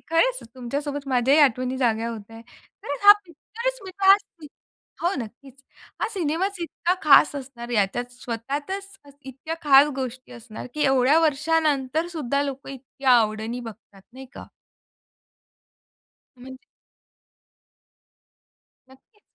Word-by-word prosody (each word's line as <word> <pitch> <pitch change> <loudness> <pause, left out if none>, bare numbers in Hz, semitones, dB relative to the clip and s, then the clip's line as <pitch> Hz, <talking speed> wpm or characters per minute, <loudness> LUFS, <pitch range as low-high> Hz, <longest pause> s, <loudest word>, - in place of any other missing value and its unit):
खरंच - - +2
तुमच्या 255 +2 -4
सोबत 290 -1 -5
माझ्याही 260 +3 +3
आठवणी 255 -2 +2
जागा 230 -3 0
होतायंत. 225 0 -9 0.4
कारण 285 - -4
हा 410 - +13
पिक्चरच 465 - -6
मी 380 - -8
पाहा 390 0 +7 0.9
हो, 350 +3 +1
नक्कीच. 265 +4 -14 0.4
हा - - 0
सिनेमाच 370 +3 -1
इतका 340 +1 -1
खास 295 0 +6
असणार. 255 -3 -9
याच्यात 240 +3 -1
स्वतःतच 285 - -6 0.3
इतक्या 270 +5 -7
खास 280 0 +6
गोष्टी 255 -1 -6
असणार 230 -3 -10
की 300 -1 0
एवढ्या 270 +2 +4
वर्षानंतर 305 -1 +1
सुद्धा 280 -1 -1
लोकं 275 -1 -6
इतक्या 270 0 -3
आवडीनी 220 +2 -3
बघतात, 220 -4 -12
नाही 265 +1 -11
का? - - -10 1.9
म्हणजे 260 +1 -12 2.3
नक्कीच. 265 - -23
270 Hz, 115 wpm, -24 LUFS, 245-310 Hz, 2.3 s, हा